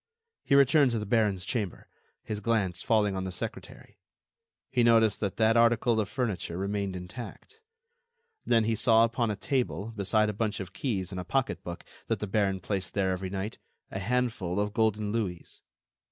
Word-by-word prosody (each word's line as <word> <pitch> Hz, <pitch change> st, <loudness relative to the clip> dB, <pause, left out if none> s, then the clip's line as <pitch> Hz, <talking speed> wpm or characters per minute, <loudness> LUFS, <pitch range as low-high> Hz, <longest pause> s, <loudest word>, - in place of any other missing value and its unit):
He 140 Hz, -, +3 dB
returned 140 Hz, 0 st, +6 dB
to 120 Hz, -, -1 dB
the 105 Hz, -, -3 dB
baron's 105 Hz, -4 st, +1 dB
chamber, 105 Hz, -5 st, -3 dB, 0.4 s
his 105 Hz, -, -4 dB
glance 100 Hz, -6 st, 0 dB
falling 105 Hz, -3 st, +2 dB
on 95 Hz, -, -2 dB
the 95 Hz, -, -4 dB
secretary, 90 Hz, -, -7 dB, 0.7 s
he 125 Hz, -, +2 dB
noticed 115 Hz, -3 st, +4 dB
that 100 Hz, -3 st, -2 dB
that 110 Hz, 0 st, +4 dB
article 115 Hz, 0 st, +4 dB
of 105 Hz, -2 st, -1 dB
furniture 105 Hz, -8 st, -2 dB
remained 100 Hz, 0 st, -2 dB
intact. 105 Hz, -, -9 dB, 0.8 s
Then, 115 Hz, -1 st, +3 dB
he 115 Hz, +1 st, +1 dB
saw 115 Hz, 0 st, +4 dB
upon 115 Hz, 0 st, +1 dB
a 105 Hz, -, -1 dB
table, 115 Hz, -1 st, -2 dB
beside 105 Hz, +1 st, +2 dB
a 105 Hz, -, -1 dB
bunch 105 Hz, +1 st, -1 dB
of 95 Hz, -2 st, -7 dB
keys 100 Hz, -7 st, -2 dB
and 95 Hz, -, -4 dB
a -, -, -6 dB
pocketbook 120 Hz, -8 st, -2 dB, 0.2 s
that -, -, 0 dB
the -, -, -4 dB
baron 95 Hz, -2 st, 0 dB
placed 95 Hz, 0 st, -3 dB
there 95 Hz, -2 st, +1 dB
every 95 Hz, 0 st, -3 dB
night, 95 Hz, +3 st, -4 dB, 0.3 s
a 95 Hz, -, -3 dB
handful 110 Hz, -4 st, -1 dB
of 105 Hz, 0 st, -1 dB
golden 110 Hz, -2 st, +1 dB
louis. 100 Hz, -7 st, -4 dB
105 Hz, 175 wpm, -29 LUFS, 95-115 Hz, 0.8 s, returned